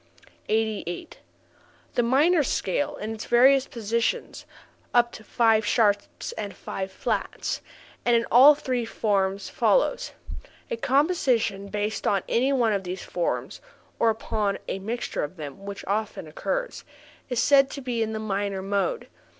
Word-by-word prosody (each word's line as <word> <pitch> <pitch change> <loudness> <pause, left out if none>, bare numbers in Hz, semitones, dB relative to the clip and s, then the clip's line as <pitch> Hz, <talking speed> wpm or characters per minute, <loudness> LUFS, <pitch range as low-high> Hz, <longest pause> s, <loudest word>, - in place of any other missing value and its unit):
88. 215 -5 -2 0.7
The - - +2
minor 295 +8 +4
scale 265 -1 -1
in 215 +1 -5
its 220 - -7
various 265 +3 +5
positions 230 0 -2 0.5
(up 240 0 +4
to 220 - -11
five 225 -1 +3
sharps 205 -2 +1
and 205 -2 -6
five 190 0 -5
flats) 215 +2 -2 0.4
and 240 - +3
in 230 0 +2
all 275 +5 +9
three 255 -4 -2
forms 200 -3 0
follows: - - +1 0.6
a 235 - -1
composition 260 - +1
based 210 +1 -2
on 195 -2 +2
any 260 +4 +2
one 240 -5 +2
of 195 -1 -1
these 180 +1 -5
forms 175 -1 -3 0.4
(or 230 - +4
upon 215 -2 -1
a 195 - -3
mixture 225 +5 -3
of 150 +5 -6
them, 150 +5 -8
which 200 -1 -6
often 210 -2 -2
occurs) - - -3 0.5
is 245 -2 -1
said 275 +2 +5
to - - -6
be 250 -3 -2
in 220 0 0
the 220 - -3
minor 200 -2 -2
mode. 200 - -1
220 Hz, 145 wpm, -25 LUFS, 200-250 Hz, 0.7 s, all